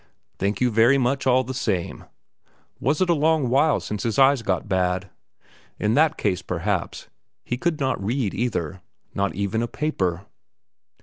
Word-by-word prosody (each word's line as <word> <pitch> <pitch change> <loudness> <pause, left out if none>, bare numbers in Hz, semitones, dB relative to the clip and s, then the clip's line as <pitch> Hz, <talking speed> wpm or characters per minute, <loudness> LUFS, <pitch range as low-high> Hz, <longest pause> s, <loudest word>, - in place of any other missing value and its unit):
Thank 100 +4 -1
you 125 -1 +3
very 115 +5 +5
much 135 +1 0
all 130 0 +4
the 130 +1 -5
same. 100 -9 -2 0.7
Was 150 +6 0
it 185 - +2
long 150 -2 +2
since 105 -1 -4
his 115 -3 -2
eyes 135 -1 +5
got 95 -3 -1
bad? 95 -1 -1 0.7
In 105 +1 +1
that 155 +3 +3
case, 90 - 0
perhaps, 90 +1 -3 0.4
he 125 - -2
could 160 +4 -1
not 130 -7 -1
read 115 0 -1
either, 95 -6 -2 0.3
not 100 -1 -1
even 100 +3 -1
a 120 - -1
paper? 95 - -2
115 Hz, 150 wpm, -23 LUFS, 95-135 Hz, 0.7 s, very